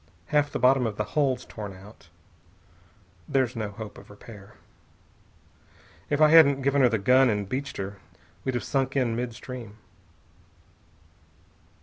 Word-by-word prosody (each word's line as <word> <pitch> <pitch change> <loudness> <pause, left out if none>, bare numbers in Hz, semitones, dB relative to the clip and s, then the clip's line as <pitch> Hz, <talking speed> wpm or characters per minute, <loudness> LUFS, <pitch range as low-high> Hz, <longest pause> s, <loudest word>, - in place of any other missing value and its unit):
Half 145 -1 +2
the - - -2
bottom 125 0 +3
of 105 -2 -6
the 105 - 0
hull's 140 -4 0
torn 105 -3 -8
out. 95 -3 -16 1.2
There's 130 -3 0
no 110 -2 -3
hope 105 +1 -9
of - - -17
repair. 105 -1 -14 1.5
If 145 - 0
I 155 -1 +6
hadn't 140 -4 +6
given 140 +1 +2
her 125 - +5
the 115 - 0
gun 125 +5 +4
and 105 -2 -1
beached 135 +6 -4
her, 100 0 -6 0.4
we'd 130 - -2
have 120 - -2
sunk 135 +2 -1
in 125 -4 +1
mid 120 -1 -4
stream." 115 -5 -9
125 Hz, 145 wpm, -26 LUFS, 105-135 Hz, 1.5 s, I